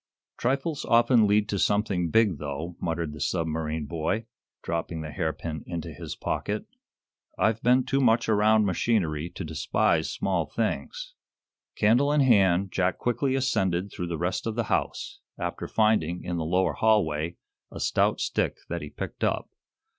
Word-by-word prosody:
"Trifles 140 +4 -1
often 115 -1 +4
lead 105 +1 +3
to 100 - -1
something 100 -5 +1
big, 105 -6 +3
though," 75 +4 -5
muttered 80 -3 -2
the 75 - -9
submarine 80 -1 -1
boy, 85 +9 -2 0.4
dropping 85 -1 -3
the 75 -1 -6
hairpin 80 -2 -3
into 85 -2 -5
his - - -7
pocket. - - -3 0.7
"I've 110 +1 +1
been 125 +2 +4
too 135 - 0
much 115 -2 +3
around 110 0 +4
machinery 85 -5 0
to - - -7
despise - - +1
small - - -1
things." - - -3 0.6
Candle 120 +7 +3
in 150 -1 +3
hand, 100 -7 +4
Jack 90 -1 0
quickly 125 +3 0
ascended 95 -8 0
through 90 - -4
the 85 -1 -3
rest 90 +6 -2
of 110 - -2
the 120 - 0
house, - - -2 0.2
after - - -4
finding, 100 -6 +1
in 90 -1 -3
the 80 - -2
lower 90 +3 +1
hallway, 85 -7 +1 0.3
a - - -9
stout - - +1
stick - - -1
that 85 0 -3
he 75 - -7
picked - - -6
up. - - 0
95 Hz, 155 wpm, -27 LUFS, 85-115 Hz, 0.7 s, often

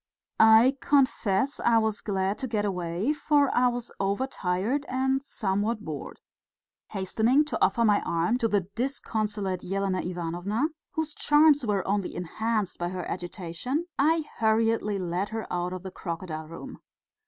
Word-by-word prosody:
I 225 +5 +7
confess 260 -3 +2
I 235 -1 +3
was 220 -1 0
glad 195 0 -1
to 265 - -2
get 215 -3 -1
away, 180 - -1
for 290 -2 +2
I 250 +1 +4
was 245 -1 -3
overtired 200 +3 -1
and 265 +1 +1
somewhat 215 -3 -2
bored. 150 -3 -7 0.7
Hastening 220 +9 +2
to 300 - -1
offer 230 +5 +3
my 205 -2 +4
arm 170 +9 0
to 230 - +2
the 205 -2 +2
disconsolate 210 -3 -2
Elena 195 0 -1
Ivanovna, 180 - -2 0.2
whose 315 -1 -2
charms 295 -1 +4
were 200 -3 0
only 200 -1 -1
enhanced 210 +3 -2
by 175 0 -1
her 180 -1 -5
agitation, 185 - -4
I 315 +2 +3
hurriedly 220 -1 +2
led 180 +2 -2
her 225 0 -4
out 180 0 -1
of 185 0 -6
the 190 - -6
crocodile 165 -3 -5
room. 165 - -9
210 Hz, 145 wpm, -27 LUFS, 185-250 Hz, 0.7 s, I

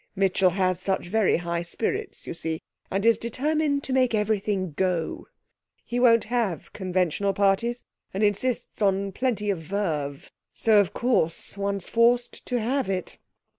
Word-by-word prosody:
Mitchell 190 -1 +3
has 185 -1 +1
such 190 -2 -1
very 215 0 +3
high 170 0 -2
spirits, 380 - -3
you - - -5
see, 160 -1 -3 0.3
and 195 +3 -1
is 230 0 +5
determined 285 +4 0
to 265 - -3
make 255 -3 +3
everything 205 -3 0
go. 175 +1 -1 0.6
He 245 0 -2
won't 230 -3 +5
have 220 - -2
conventional 185 0 0
parties, 205 +5 +1 0.3
and 195 +3 -1
insists 215 +4 -1
on 195 -1 +1
plenty 210 -2 0
of 190 - -3
verve; 155 -6 -3 0.2
so, 220 -2 +4
of 200 - +2
course, 235 -11 0
one's 200 -1 -2
forced 240 +1 +2
to 250 -1 0
have 255 +2 -1
it.' 185 -2 -3
200 Hz, 150 wpm, -25 LUFS, 185-235 Hz, 0.6 s, is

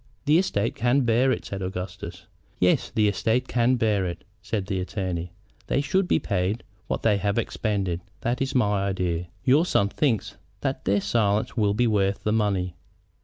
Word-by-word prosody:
"The 150 +3 +5
estate 115 - 0
can 120 +4 +2
bear 120 +2 +3
it," - - -2
said 100 -1 -5
Augustus. 90 -1 -6 0.3
"Yes, 90 0 +3
the 110 -1 +2
estate 115 +5 +1
can 125 +1 +2
bear 110 -5 +1
it," 85 -1 -6 0.2
said 105 -4 -2
the 95 -2 -2
attorney. 90 -2 -3 0.4
"They - - +1
should 190 +6 +1
be - - +3
paid 100 +2 -1 0.2
what - - -2
they 105 -3 +4
have 100 +2 -1
expended. 100 -6 -1 0.2
That 120 +2 -1
is 135 0 -1
my 105 -5 +2
idea. 90 -3 -1 0.2
Your 140 +5 +5
son 100 - +2
thinks 115 -4 0 0.2
that - - -2
their 100 +2 +2
silence 105 -2 +1
will 105 -3 +2
be 120 +3 +3
worth 100 -3 +1
the 105 - +1
money." 100 -5 0
105 Hz, 175 wpm, -25 LUFS, 95-120 Hz, 0.4 s, The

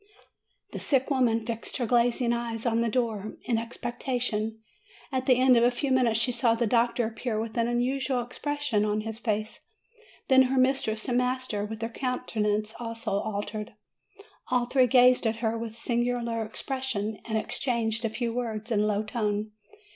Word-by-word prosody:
The - - -5
sick 270 0 +1
woman 235 -4 +2
fixed 230 -1 -3
her 250 - -1
glazing 240 +1 +2
eyes 235 -1 -3
on 230 -1 +2
the 235 - +1
door, 220 -3 -1
in 230 -2 +1
expectation. 230 -2 -3 0.5
At 260 -1 -2
the 255 - +6
end 255 -1 +6
of 235 - +4
a 240 - +6
few 265 +3 -2
minutes 240 -4 +3
she 250 +2 +2
saw 235 -1 +2
the 235 +1 0
doctor 235 +1 +2
appear 225 0 -3
with 220 0 -4
an 230 -1 +1
unusual 250 +1 0
expression 290 -3 -1
on 210 0 0
his 220 +1 -6
face; 215 -1 -2 0.7
then 265 -1 +7
her 265 - 0
mistress 255 -4 +2
and 245 -1 +2
master, 250 -4 -1
with 220 +1 -7
their 225 - -1
countenances 215 -4 -1
also 230 -1 -4
altered. 210 +1 -4 0.7
All 250 -1 +1
three 255 0 +3
gazed 250 -1 +5
at 220 - 0
her 225 0 -1
with 230 -1 -5
a - - -18
singular 235 -1 -1
expression, 220 -2 -3
and 220 -1 -1
exchanged 230 -1 -1
a 225 - +1
few 230 +1 -2
words 230 -2 -3
in 215 - +2
a 210 - +2
low 210 0 0
tone. 215 -1 -2
235 Hz, 175 wpm, -27 LUFS, 220-250 Hz, 0.7 s, then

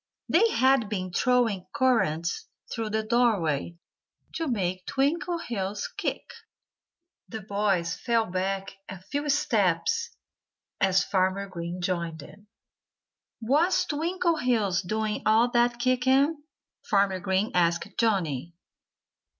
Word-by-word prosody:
They 445 +7 +4
had 260 - +3
been 185 -4 -4
throwing 230 -6 +1
currants 170 -11 +1 0.3
through 225 -2 -3
the 220 +1 -1
doorway, 200 - +1 0.6
to 325 - -3
make 185 -7 -2
Twinkleheels 270 - -1
kick. - - -2 1.1
The 220 -2 -6
boys 195 -4 0
fell 230 -2 +1
back 190 +1 -3 0.2
a 190 -1 -7
few 285 +10 -4
steps 290 - +1 0.7
as 190 0 +3
Farmer 190 +1 0
Green 175 -1 -6
joined 170 -2 -2
them. 200 +7 -14 1.0
"Was 335 +9 +2
Twinkleheels 300 - 0
doing 215 +3 -2
all 225 +3 +3
that 240 0 +2
kicking?" 260 +5 +2 0.4
Farmer 195 -2 +2
Green 190 +3 0
asked 170 0 +2
Johnnie. 170 - 0
215 Hz, 105 wpm, -27 LUFS, 185-255 Hz, 1.1 s, They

